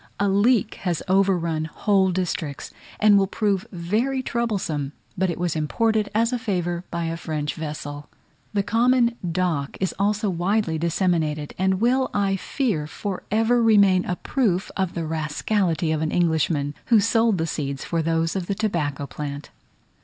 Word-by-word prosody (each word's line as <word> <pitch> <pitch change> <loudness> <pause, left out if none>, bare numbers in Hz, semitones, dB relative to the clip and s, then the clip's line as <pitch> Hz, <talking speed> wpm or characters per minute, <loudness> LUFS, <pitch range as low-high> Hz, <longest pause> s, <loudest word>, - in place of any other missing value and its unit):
A 200 - +2
leek 205 +3 +2
has 175 -5 -1
overrun 180 -5 +2
whole 190 +4 +2
districts, 175 -5 -3 0.3
and 210 -1 +6
will 195 - +2
prove 205 0 -1
very 220 +10 -1
troublesome, 195 - -2 0.2
but 190 0 +1
it 170 - -3
was 175 -2 -1
imported 215 +7 +1
as 230 +3 +2
a 250 - 0
favour 175 -6 -2
by 170 -1 -2
a 165 0 -2
French 155 -3 -3
vessel. 145 -2 -6 0.4
The 200 -2 0
common 235 +3 +3 0.2
dock 165 -5 -1
is 190 - -1
also 210 +1 +1
widely 180 -2 0
disseminated, 160 -3 0
and 190 0 +2
will, 255 +3 +2
I 195 -1 +2
fear, 195 - -1
for 190 +4 -5
ever 225 +3 +3
remain 200 -5 +5
a 180 - -1
proof 195 -5 0
of 190 -3 -1
the 170 -2 -2
rascality 160 +2 0
of 155 -1 0
an 160 - 0
Englishman, 160 -4 +1
who 230 -3 +6
sold 225 0 +3
the 160 - 0
seeds 140 -4 -3
for 165 -1 -1
those 165 +1 0
of 185 -3 -2
the 200 - -1
tobacco 155 -10 -1
plant. 145 0 -6
185 Hz, 160 wpm, -23 LUFS, 160-210 Hz, 0.4 s, and